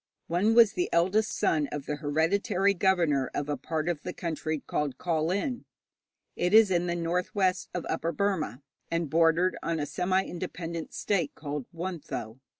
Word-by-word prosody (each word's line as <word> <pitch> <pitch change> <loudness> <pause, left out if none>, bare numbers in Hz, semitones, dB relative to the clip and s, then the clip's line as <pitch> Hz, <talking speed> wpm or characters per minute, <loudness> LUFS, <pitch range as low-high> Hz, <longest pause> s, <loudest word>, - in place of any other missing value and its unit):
One 195 +7 +2
was 230 -3 +7
the 360 - -1
eldest 190 +6 +2
son 150 -3 +2
of 145 -1 -5
the 150 - -3
hereditary 170 +6 +1
governor 170 -8 +2
of 145 - -2
a 145 - 0
part 160 +1 -3
of 170 -4 -1
the 180 - -5
country 155 -2 -3
called 145 -3 -2
Kawlin. 180 - -1 0.7
It 180 +4 +2
is 220 -3 +7
in 175 0 +2
the 175 - 0
north 175 +3 -2
west 185 -2 +1
of 180 - -3
Upper 165 - -1
Burma, 155 - -1 0.3
and 165 -3 -1
bordered 165 +3 +3
on 165 -1 -1
a 145 - -1
semi 185 +4 +1
independent 170 -2 -5
state 180 -8 0
called 145 -3 -5
Wuntho. 165 -10 -5
170 Hz, 165 wpm, -28 LUFS, 155-185 Hz, 0.7 s, was